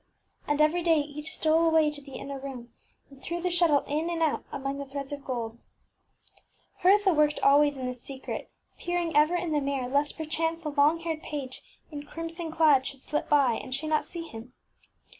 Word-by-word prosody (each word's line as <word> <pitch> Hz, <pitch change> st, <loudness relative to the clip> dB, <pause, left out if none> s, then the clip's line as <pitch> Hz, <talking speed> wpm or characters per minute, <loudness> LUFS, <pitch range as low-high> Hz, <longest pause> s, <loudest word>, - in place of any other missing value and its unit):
And 290 Hz, 0 st, 0 dB
every 310 Hz, +3 st, +3 dB
day 330 Hz, -1 st, +4 dB
each 295 Hz, +1 st, -4 dB
stole 320 Hz, +1 st, +2 dB
away 320 Hz, -2 st, +4 dB
to 295 Hz, -1 st, -8 dB
the 275 Hz, -2 st, -11 dB
inner 275 Hz, 0 st, -6 dB
room, 250 Hz, -4 st, -8 dB, 0.4 s
and 275 Hz, -1 st, -16 dB
threw 340 Hz, +4 st, -3 dB
the 360 Hz, +1 st, -1 dB
shuttle 335 Hz, -5 st, +4 dB
in 310 Hz, +4 st, -1 dB
and 335 Hz, -1 st, 0 dB
out 310 Hz, -, 0 dB
among 275 Hz, 0 st, -4 dB
the 280 Hz, -, -4 dB
threads 275 Hz, 0 st, -6 dB
of 285 Hz, -1 st, -6 dB
gold. 235 Hz, -3 st, -4 dB, 1.2 s
Hertha 390 Hz, 0 st, +5 dB
worked 300 Hz, -1 st, +3 dB
al 280 Hz, +1 st, +7 dB
ways 290 Hz, -1 st, +2 dB
in 255 Hz, -1 st, -3 dB
secret, 260 Hz, +2 st, -7 dB, 0.3 s
peering 350 Hz, -1 st, -2 dB
ever 305 Hz, +4 st, +5 dB
in 350 Hz, -2 st, -1 dB
the 295 Hz, -1 st, +1 dB
mirror, 275 Hz, -2 st, -1 dB
lest 285 Hz, +3 st, 0 dB
perchance 325 Hz, +1 st, -2 dB
the 305 Hz, -, -2 dB
long 295 Hz, +3 st, +3 dB
haired 325 Hz, -2 st, -3 dB
page 275 Hz, -5 st, -6 dB, 0.3 s
in 290 Hz, -1 st, -5 dB
crimson 330 Hz, +2 st, -6 dB
clad 305 Hz, -5 st, +4 dB
should 275 Hz, -1 st, -8 dB
slip 300 Hz, -, -2 dB
by 280 Hz, -4 st, +5 dB
and 255 Hz, +3 st, -4 dB
she 290 Hz, +3 st, -4 dB
not 310 Hz, 0 st, +1 dB
see 340 Hz, -2 st, -7 dB
him. 230 Hz, 0 st, -10 dB
295 Hz, 195 wpm, -28 LUFS, 275-325 Hz, 1.2 s, al